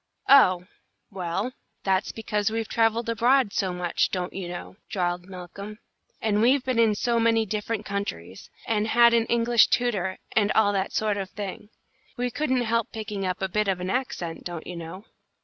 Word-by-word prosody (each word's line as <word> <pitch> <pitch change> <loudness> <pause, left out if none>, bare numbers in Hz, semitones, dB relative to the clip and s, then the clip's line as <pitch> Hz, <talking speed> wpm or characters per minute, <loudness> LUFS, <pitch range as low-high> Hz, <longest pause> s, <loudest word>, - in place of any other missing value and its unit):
"Oh, 185 -10 +6 0.5
well, 190 +5 -3 0.3
that's 190 0 +1
because 215 -1 -1
we've 225 0 -2
travelled 225 0 +1
abroad 230 0 +3
so 190 -2 0
much, 180 -1 0
don't 180 -1 -3
you 190 -2 -5
know," 175 +2 -8
drawled 175 -2 -2
Malcolm, 195 +3 -8 0.4
"and 210 -1 +1
we've 255 +3 +3
been 255 -3 0
in 220 -2 +4
so 235 +2 +1
many 225 -1 +3
different 215 +1 -3
countries, 100 - -5 0.2
and 215 -1 0
had 235 +1 +5
an 230 -1 +3
English 235 0 +4
tutor, 200 -7 0 0.2
and 210 -2 +3
all 205 -2 +3
that 195 -1 -1
sort 215 -1 0
of 195 -1 -4
a - - -35
thing. 205 0 -6 0.5
We 245 0 -1
couldn't 260 -2 0
help 230 -1 0
picking 210 -3 -4
up 185 +1 -3
a - - +1
bit 210 +3 0
of 190 -2 0
an 180 +1 -3
accent, 185 -10 -3
don't 170 -2 -6
you 180 - -7
know." 170 +5 -8
210 Hz, 185 wpm, -26 LUFS, 185-230 Hz, 0.5 s, Oh